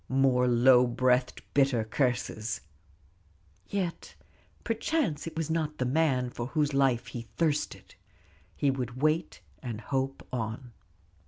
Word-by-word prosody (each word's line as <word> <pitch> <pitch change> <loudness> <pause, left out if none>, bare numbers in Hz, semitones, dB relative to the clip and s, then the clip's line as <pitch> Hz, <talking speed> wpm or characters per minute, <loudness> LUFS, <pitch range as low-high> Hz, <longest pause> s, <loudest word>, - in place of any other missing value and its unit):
More 130 -1 +3
low 125 +1 +6
breathed, 125 +1 +1
bitter 135 -5 +3
curses: 115 -2 -1 1.1
yet 185 -4 -3 0.5
perchance 230 - -1
it 165 - -7
was 160 -1 -1
not 155 -2 -1
the 130 - 0
man 130 -3 +1
for 120 0 -4
whose 150 0 0
life 135 -4 +2
he 120 -2 -7
thirsted. 155 -3 -1 0.6
He 140 - +2
would 125 -2 -4
wait 155 - 0 0.2
and 115 -3 -5
hope 135 +2 -3
on. 120 +1 -4
130 Hz, 120 wpm, -29 LUFS, 125-150 Hz, 1.1 s, low